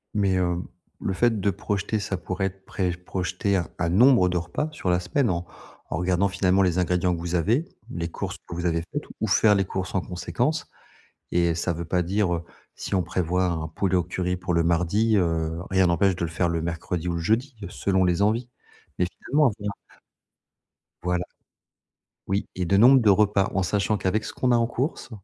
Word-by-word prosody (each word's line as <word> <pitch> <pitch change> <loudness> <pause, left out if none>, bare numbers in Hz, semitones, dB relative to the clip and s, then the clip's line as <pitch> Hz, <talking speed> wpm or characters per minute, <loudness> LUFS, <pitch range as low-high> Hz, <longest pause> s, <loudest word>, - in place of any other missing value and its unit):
Mais 100 -2 +2
heu, 90 -1 0 0.4
le 95 - -1
fait 115 +1 +2
de 100 - +1
projeter, 100 +2 -2
ça 100 -2 -3
pourrait 90 +2 -3
être 95 0 -6
préj 90 -2 -2
projeter 95 +2 -1
un 85 - -2
un 85 -1 +1
nombre 110 -1 +5
de 90 - 0
repas 85 - -2
sur 95 -11 -3
la 90 - +2
semaine 115 +7 0
en 85 +1 -2 0.4
en - - -2
regardant 90 +3 +2
finalement 95 0 +2
les 90 0 +1
ingrédients 90 0 +1
que - - -6
vous 85 +1 -3
avez, 115 - +2 0.3
les 85 -1 -3
courses - - -5
que 85 - -6
vous 85 0 -3
avez 85 -1 +1
faites 145 - -3 0.2
ou 110 - +1
faire 105 0 +5
les 95 -1 +1
courses 95 0 -4
en 95 - +1
conséquence. 120 - -2 0.7
Et 85 -1 +3
heu, 85 - 0
ça 85 +1 0
veut 85 +1 -5
pas 90 +1 +1
dire, 95 +1 0
heu, 85 - -4 0.3
si - - -4
on 90 - +2
prévoit 90 +1 0
un 80 -3 -2
poulet 95 +4 -1
au 90 - +3
curry 90 +1 -2
pour 90 -1 -2
le 85 - +3
mardi, 90 +7 +2
heu, 80 -3 0
rien 95 -1 +4
n'empêche 95 +3 +3
de 85 - -2
le 80 - -3
faire 85 +2 0
le 85 -1 -1
mercredi 85 +1 -3
ou - - 0
le - - -1
jeudi, 115 +8 0
selon 95 0 +1
les 90 +1 +1
envies. 115 +4 +1 0.5
Mais 90 - +2 0.2
finalement 145 -3 +4
avoir 105 -1 -5 1.3
Voilà. 90 0 0 1.0
Oui 95 +1 -1
et 90 -1 -1
de 100 +3 +3
nombre 125 +4 +7
de 105 - +4
repas 100 -1 +3
en 95 - +1
sachant 105 +3 0
qu'avec 100 +3 0
ce - - -6
qu'on 125 -1 +1
a - - +5
en 115 -1 +2
course, 130 +5 -3
95 Hz, 210 wpm, -25 LUFS, 85-105 Hz, 1.3 s, nombre